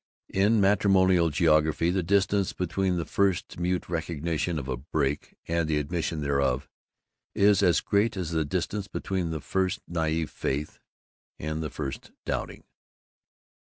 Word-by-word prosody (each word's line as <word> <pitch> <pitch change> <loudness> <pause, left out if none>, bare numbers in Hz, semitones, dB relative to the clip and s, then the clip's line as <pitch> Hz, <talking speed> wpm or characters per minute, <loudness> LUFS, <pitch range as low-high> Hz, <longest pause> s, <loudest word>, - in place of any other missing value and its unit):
In 105 +3 +3
matrimonial 95 -3 +4
geography 80 +1 +3
the 95 +1 +1
distance 100 +2 +2
between 90 +1 -1
the 85 - -2
first 95 -3 0
mute 90 +1 -1
recognition 85 0 -2
of 70 -3 -4
a 65 - -1
break 70 +2 -2
and 85 -1 0
the 75 - +2
admission 80 +1 -2
thereof 70 -2 0 0.7
is 100 0 +5
as 85 -4 +4
great 100 0 +1
as 85 -3 -3
the 80 -1 +1
distance 95 +6 -2
between 95 -5 -2
the 80 -2 -3
first 95 +4 0
naïve 80 -1 -1
faith 70 +3 -3 0.6
and 80 +1 -3
the 80 - -3
first 70 -3 -5 0.2
doubting. - - -3
85 Hz, 140 wpm, -27 LUFS, 75-95 Hz, 0.7 s, is